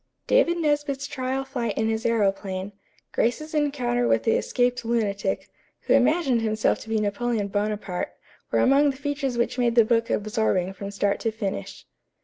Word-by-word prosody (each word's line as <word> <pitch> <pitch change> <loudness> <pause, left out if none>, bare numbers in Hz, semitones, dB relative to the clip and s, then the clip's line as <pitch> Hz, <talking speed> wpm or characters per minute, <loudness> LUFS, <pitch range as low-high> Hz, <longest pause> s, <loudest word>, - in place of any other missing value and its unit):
David 345 -9 +3
Nesbit's 290 -3 0
trial 270 -1 -3
flight 240 -5 -3
in 220 - +1
his 225 +1 -1
aëroplane, 195 -3 0 0.4
Grace's 305 +7 -1
encounter 255 -5 +1
with - - +2
the 225 - +2
escaped 245 +1 +1
lunatic, 205 -4 -1 0.3
who - - +1
imagined 280 -8 +3
himself 215 -1 +1
to 225 - -11
be 220 -1 +1
Napoleon 210 0 -1
Bonaparte, 205 -2 -2 0.4
were - - +2
among 280 +2 +5
the 270 - -4
features 285 -3 -2
which 235 +2 0
made 235 -1 +2
the 230 -2 +6
book 230 0 +1
absorbing 210 -4 0
from 200 +1 -6
start 200 0 0
to 225 - -1
finish. 200 - -5
230 Hz, 160 wpm, -25 LUFS, 210-270 Hz, 0.4 s, the